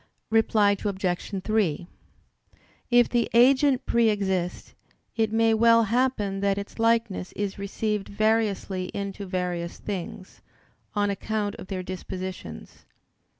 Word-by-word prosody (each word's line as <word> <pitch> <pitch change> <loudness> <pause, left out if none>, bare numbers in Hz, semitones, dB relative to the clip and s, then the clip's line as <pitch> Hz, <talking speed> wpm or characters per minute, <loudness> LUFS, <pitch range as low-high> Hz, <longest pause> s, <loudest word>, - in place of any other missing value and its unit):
Reply 215 -2 +4
Obj. 190 -4 -2
3: 195 -7 0 1.0
If 240 -1 +5
the 240 -1 0
agent 260 +2 +5
pre 235 -1 +3
exist, 190 -4 -2 0.4
it 220 -1 +1
may 225 0 +3
well 230 +1 +5
happen 225 -4 0
that 200 0 +1
its 200 +3 -7
likeness 225 -5 +1
is 200 -1 -4
received 210 0 -2
variously 205 -3 0
into 200 0 -4
various 180 -2 -3
things, 190 -1 -7 0.5
on 205 -1 +1
account 205 +1 -2
of - - -9
their 185 -2 -4
dispositions. 185 - -7
205 Hz, 115 wpm, -26 LUFS, 190-225 Hz, 1.0 s, If